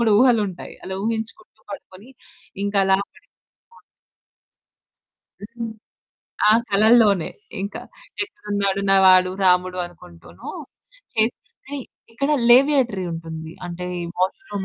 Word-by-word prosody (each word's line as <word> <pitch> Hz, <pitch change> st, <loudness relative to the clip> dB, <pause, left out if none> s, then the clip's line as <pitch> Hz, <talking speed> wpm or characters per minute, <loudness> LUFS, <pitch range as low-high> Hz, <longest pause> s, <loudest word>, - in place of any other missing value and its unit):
కూడా 230 Hz, -2 st, +3 dB
ఊహలుంటాయి. 220 Hz, -8 st, +1 dB
అలా 190 Hz, -, -5 dB
ఊహించుకుంటూ 225 Hz, +10 st, -5 dB
పడుకొని, 190 Hz, +6 st, -10 dB, 0.5 s
ఇంకలా 195 Hz, -1 st, +3 dB, 0.2 s
పడిపోతే -, -, -26 dB, 0.3 s
బాగున్ను. -, -, -19 dB, 1.7 s
హ్మ్. 230 Hz, -1 st, -5 dB, 0.8 s
ఆహ్, 220 Hz, +2 st, +6 dB
కళల్లోనే 210 Hz, -3 st, +4 dB, 0.3 s
ఇంకా 200 Hz, -, -5 dB, 0.4 s
ఎక్కడున్నాడు 200 Hz, -, -2 dB
నా 195 Hz, -, +6 dB
వాడు 185 Hz, 0 st, +6 dB
రాముడు 180 Hz, 0 st, +3 dB
అనుకుంటూనూ, 85 Hz, -, -12 dB, 0.6 s
చేసింది. 220 Hz, +2 st, +1 dB, 0.8 s
ఇక్కడ 275 Hz, +6 st, -1 dB, 0.2 s
లేవియేటరీ 250 Hz, -7 st, +4 dB
ఉంటుంది. 160 Hz, -1 st, -7 dB
అంటే 175 Hz, +1 st, -6 dB, 0.3 s
వాష్‌రూమ్ 195 Hz, -, -2 dB
200 Hz, 95 wpm, -22 LUFS, 185-230 Hz, 1.7 s, ఆహ్